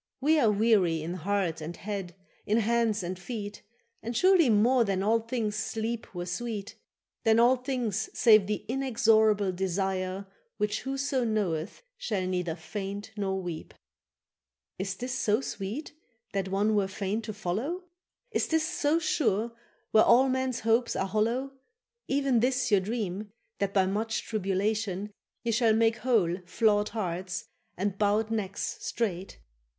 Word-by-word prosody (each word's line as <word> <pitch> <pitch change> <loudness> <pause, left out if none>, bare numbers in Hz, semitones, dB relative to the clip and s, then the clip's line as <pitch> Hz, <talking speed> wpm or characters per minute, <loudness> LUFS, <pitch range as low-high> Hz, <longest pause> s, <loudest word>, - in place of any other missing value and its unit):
—We 305 +4 +3
are 230 - +4
weary 200 -7 +3
in 170 +2 -3
heart 180 -2 -1
and 165 +2 -6
head, 195 -4 -5 0.3
in 215 - +3
hands 225 -2 +1
and 180 +1 -4
feet, 205 +1 -6 0.4
And 230 +1 -3
surely 365 -5 +5
more 235 +4 +4
than 195 -3 0
all 225 +3 +3
things 225 -2 -2
sleep 225 0 -3
were 175 0 -3
sweet, 210 +2 -4 0.5
Than 225 0 +4
all 245 +2 +6
things 245 -5 -2
save 215 -5 +6
the 210 0 -2
inexorable 220 -6 +3
desire 190 +1 -2 0.3
Which 210 0 0
whoso 270 -1 -1
knoweth 210 - -1 0.2
shall 205 - -1
neither 180 -3 -1
faint 200 +4 -6
nor 195 -2 -1
weep. 175 -4 -6 1.0
—Is 195 +1 -2
this 250 +4 -4
so 215 -3 +2
sweet 230 +4 -5 0.4
that 195 -1 -1
one 200 +3 +1
were 200 -2 +2
fain 195 +3 -2
to 215 -1 -5
follow? 215 - -3 0.5
Is - - 0
this 320 -1 +1
so 300 -1 +1
sure 235 - +1 0.4
where 220 - +6
all 260 +3 +6
men's 260 -1 -1
hopes 230 +2 +2
are 190 - 0
hollow, 230 +7 0 0.6
Even 275 -3 +2
this 250 0 +1
your 200 -2 +5
dream, 205 -1 -3 0.3
that 200 -1 0
by 195 -2 +3
much 215 +3 -1
tribulation 205 -1 -1 0.3
Ye 235 - 0
shall 225 -1 +3
make 225 0 +3
whole 205 -8 +2
flawed 210 +1 +2
hearts, 180 -3 -3 0.3
and 195 +1 -2
bowed 210 +2 +2
necks 205 -3 -2
straight? 195 -5 -3
215 Hz, 145 wpm, -29 LUFS, 195-235 Hz, 1.0 s, all